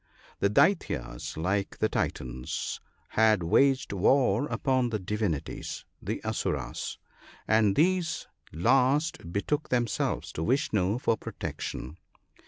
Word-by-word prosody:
The 100 - +3
Daityas, 105 - +1
like 95 +4 -1
the 110 - +2
Titans, 65 - -3 0.3
had 110 -4 +3
waged 130 +8 +3
war 125 +5 +3
upon 130 -4 +1
the 110 - -1
divinities 100 -6 -3 0.2
(the - - -3
Asuras), - - -2 0.5
and 110 -3 +4
these 170 0 +1 0.3
last 130 - +2
betook 145 - -1
themselves 120 -3 0
to - - -5
Vishnoo 110 - +1
for 115 -2 +1
protection. 85 -4 -6
110 Hz, 105 wpm, -28 LUFS, 95-135 Hz, 0.5 s, and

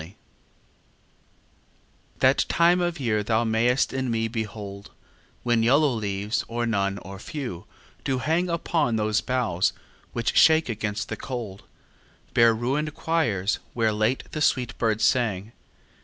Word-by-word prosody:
LXXIII 85 +6 -12 2.1
That - - +4
time 175 +1 +4
of 175 -2 -1
year 110 -5 0
thou 110 +2 +1
mayst 115 +3 +1
in 130 -1 -1
me 115 -1 0
behold 105 -3 -6 0.5
When 120 -2 +2
yellow 140 +4 +4
leaves, 105 -1 -2
or 120 +1 -2
none, 100 -3 0
or 95 0 -9
few, 120 - -6 0.4
do 130 - 0
hang 165 +6 0
Upon 165 -7 0
those 110 0 +1
boughs 115 -9 0 0.4
which - - -1
shake 160 -3 +5
against 105 -2 -3
the - - -4
cold, 115 -7 -6 0.7
Bare 115 -1 +5
ruin'd 140 +6 -2
choirs, 115 - 0 0.2
where 110 -2 +2
late 110 +5 0
the 155 - -4
sweet 125 -4 +1
birds 110 -2 +1
sang. 110 -5 +1
115 Hz, 135 wpm, -25 LUFS, 105-130 Hz, 2.1 s, shake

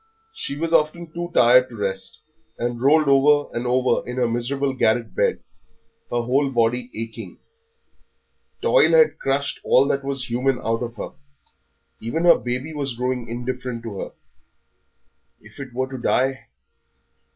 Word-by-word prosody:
She 145 - -4
was 165 +2 -2
often 160 +1 +1
too 175 0 -4
tired 125 -3 +5
to 120 - -11
rest, 95 -2 -4 0.4
and 120 0 -3
rolled 150 +3 +4
over 145 +1 +3
and 120 +1 -2
over 125 0 +2
in 125 - -4
her 125 -2 +1
miserable 135 +4 -1
garret 115 -3 +1
bed, - - 0 0.7
her 120 0 -1
whole 135 +4 +1
body 120 0 0
aching. 115 -3 -7 1.3
Toil 485 -1 +5
crushed 140 +1 -1
all 135 +2 +4
that 140 -1 0
was 135 -2 -3
human 125 +2 +1
out 115 0 -2
of 120 -1 -5
her; - - -6 0.9
even 160 +10 -2
her 170 - +6
baby 125 +7 -4
was 140 -5 -3
growing 125 0 -2
indifferent 125 0 -5
to 105 -4 -6
her. - - -5 1.3
If 105 +5 -17
it 140 -2 -7
were 130 +2 -3
to 130 - -6
die! 130 +2 0
125 Hz, 150 wpm, -22 LUFS, 120-140 Hz, 1.3 s, her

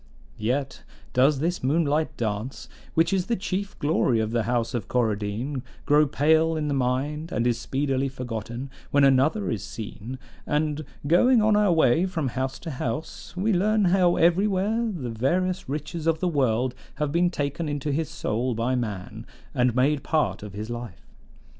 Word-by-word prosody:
"Yet 130 +5 -1 0.3
does 135 +3 +4
this 170 -1 -1
moonlight 155 +2 +1
dance, 110 +3 -3 0.3
which 165 +2 +3
is 185 -1 0
the 235 - +1
chief 200 0 -3
glory 145 -5 +2
of 110 0 -1
the 115 0 +1
House 120 0 0
of 120 -5 -3
Coradine, 115 +3 -1 0.2
grow 150 +1 +5
pale 160 +3 +3
in 150 -1 -1
the - - 0
mind, 140 +5 -1
and 115 - 0
is 120 -1 +1
speedily 135 0 -1
forgotten, 125 0 -5 0.2
when 145 0 +3
another 140 +10 +3
is 105 -5 -3
seen; 110 +4 -7 0.3
and, 150 0 0 0.2
going 230 - +5
on 215 -1 +4
our 210 -2 +4
way 160 +1 +4
from 165 -7 -2
house 130 +2 -3
to 165 - -5
house, 125 +6 -5
we 210 +4 +1
learn 210 +3 +3
how 180 -2 +4
everywhere 200 +6 +2
the 135 - -4
various 175 +10 0
riches 155 +3 -4
of 160 -1 +2
the 180 - 0
world 130 -5 +1 0.2
have 150 -2 -1
been 175 +3 +3
taken 150 0 -2
into 145 0 -2
his 155 +2 -1
soul 120 +3 -2
by 115 +3 0
man, 105 -7 -4 0.3
and 125 -1 +2
made 135 +3 +2
part 135 - 0
of 105 -1 -8
his 105 +3 -5
life. 120 -1 -7
145 Hz, 170 wpm, -25 LUFS, 120-165 Hz, 0.3 s, grow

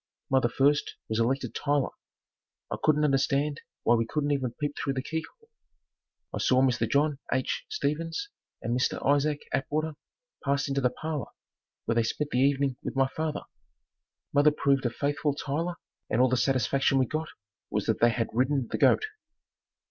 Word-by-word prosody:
Mother 130 -3 +4
first 140 +4 +2
was 110 0 0
elected 130 +4 0
Tyler. 145 -2 0 0.8
I - - -1
couldn't 150 -1 +3
understand 140 +1 +1 0.2
why 120 - +4
we 115 -1 +2
couldn't 145 +2 -1
even 130 -4 -1
peep 145 -1 -1
through 135 - -1
the 130 -1 -3
key 160 +2 -3
hole. 455 -1 -28 0.8
I - - -2
saw 130 0 +4
Mr. 130 -2 +1
John 145 0 +2
H. 130 -1 -1
Stevens 165 - -2 0.4
and 120 +1 0
Mr. 125 - +1
Isaac 145 +1 +2
Atwater 150 +4 -1 0.5
pass 140 +1 +1
into 140 0 0
the 125 - +3
parlor 150 +2 -4 0.6
where 115 - +1
they 115 - +3
spent 145 +6 -2
the 125 - +1
evening 135 -1 +2
with - - -5
my 135 0 +3
father. 155 +1 -3 0.9
Mother 145 +1 +6
proved 140 -3 +1
a - - 0
faithful 145 +3 -1
Tyler 165 +5 -2 0.3
and 110 - +1
all 130 0 +5
the 130 - +2
satisfaction 135 +2 +2
we 130 - +4
got 155 +5 -3 0.4
was - - -1
that - - +1
they 120 - +6
had 115 0 -1
"Ridden 130 +1 +1
the - - -2
goat." 435 - +5
140 Hz, 170 wpm, -28 LUFS, 130-150 Hz, 0.9 s, Mother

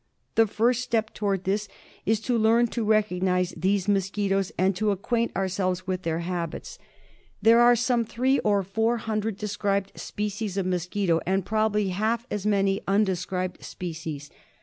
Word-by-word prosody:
The 225 -1 +4
first 230 +4 +1
step 230 -3 -1
towards 200 -3 -1
this 205 +3 -1 0.4
is 220 0 +3
to 245 +2 0
learn 230 +1 +4
to 235 - -2
recognise 185 -4 +1
these 190 +3 0
mosquitoes 195 -1 0
and 190 +1 +2
to 215 +3 0
acquaint 230 +4 0
ourselves 185 -1 -1
with 185 -1 -2
their 165 -1 -2
habits. 175 - -4 0.6
There 225 +3 +6
are 240 0 +7
some 240 0 +1
three 255 +4 +1
or 205 -2 +2
four 225 +5 0
hundred 220 -2 -2
described 200 -1 -1
species 210 -1 -4
of 195 - 0
mosquito, 180 -1 0
and 190 0 +1
probably 215 -1 +1
half 220 +5 -1
as 210 0 -2
many 195 -1 +2
unde 195 -1 +2
scribed 180 0 -4
species. 160 -4 -6
200 Hz, 155 wpm, -26 LUFS, 185-220 Hz, 0.6 s, are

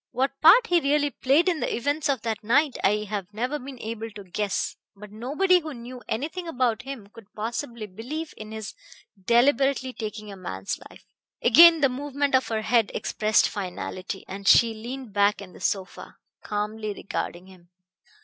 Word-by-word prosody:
What 270 +2 -2
part 400 +10 +8
he 350 -5 +3
really 290 -1 +1
played 280 +8 +2
in 345 -4 +1
the - - -1
events 285 +6 -1
of 265 -5 0
that 225 -2 -3
night 270 +6 +3
I 210 +2 +2
have 200 -2 -4
never 250 +8 -2
been 270 0 -9
able 225 0 -5
to 205 -1 -10
guess. 195 +2 -2 0.2
But 205 +1 -12
nobody 295 - +2
who 310 -4 -7
knew 245 +1 -9
anything 320 +9 -3
about 250 -6 0
him 270 -5 -8
could 225 -3 -15
possibly 235 +1 -4
believe 250 - -6
in 215 0 -9
his 220 -1 -6 0.5
deliberately 265 +2 +3
taking 215 -2 -6
a - - -8
man's 95 - -5
life." - - -17 0.4
Again 330 +5 +8
the 275 - +6
movement 280 +2 -2
of 260 0 +3
her 220 -1 -2
head 230 -2 +3
expressed 215 0 +2
finality, 185 0 -5
and 195 +1 -7
she 230 +2 +6
leaned 240 +1 -7
back 205 0 +3
in 190 -3 -10
the - - -13
sofa, 190 -2 -3 0.2
calmly 210 0 -3
regarding 175 -2 -5
him. 185 -2 -18
235 Hz, 175 wpm, -25 LUFS, 210-280 Hz, 0.5 s, part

